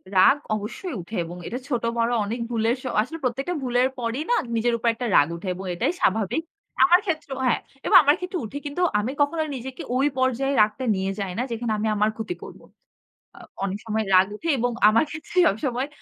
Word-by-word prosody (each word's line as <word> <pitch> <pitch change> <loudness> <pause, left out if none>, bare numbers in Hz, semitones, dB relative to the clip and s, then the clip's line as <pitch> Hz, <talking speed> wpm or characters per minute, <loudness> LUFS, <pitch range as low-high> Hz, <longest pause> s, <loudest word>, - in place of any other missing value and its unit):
রাগ 185 +9 +6 0.2
অবশ্যই 220 - -5
উঠে 195 +6 -9
এবং 175 +2 -8
এটা 245 - -4
ছোট 245 -4 -1
বড় 230 +1 +1
অনেক 225 +4 -4
ভুলের 230 0 +1
স - - -17 0.2
আসলে 295 +9 -5
প্রত্যেকটা 265 +7 -1
ভুলের 250 0 +2
পরেই 240 +4 -2
না - - +5 0.2
নিজের 235 +1 +1
উপর 230 - -2
একটা 245 +2 -5
রাগ 145 - +6
উঠে 170 +3 -8
এবং 190 +2 -7
এটাই 175 - 0
স্বাভাবিক। 215 - +1 0.4
আমার 355 0 +6
ক্ষেত্রেও 310 -7 -3
হ্যাঁ, 245 - +2 0.3
এবং 420 - +3
আমার 290 +1 +5
ক্ষেত্রেও 360 -4 -4
উঠে 245 +6 -7
কিন্তু 290 +5 -3 0.2
আমি 220 +5 -2
কখনো 315 +3 +2
নিজেকে 260 +1 -7
ওই 270 +3 +3
পর্যায়ে 260 +1 +1
রাগটা 215 +5 +1
নিয়ে 190 0 -1
যাই 195 -2 -3
না - - +1
যেখানে 230 0 -2
আমি 215 +1 -1
আমার 210 +1 +2
ক্ষতি 230 +11 -4
করব। - - -10 0.8
আ - - -12 0.2
অনেক 195 0 -2
সময় 220 0 -1
রাগ 185 +1 +6
উঠে 330 +10 -4
এবং 245 +1 +1 0.2
আমার 225 +5 +4
ক্ষেত্রে 310 +3 -8
সবসময় 245 +5 -1
240 Hz, 200 wpm, -24 LUFS, 215-275 Hz, 0.8 s, রাগ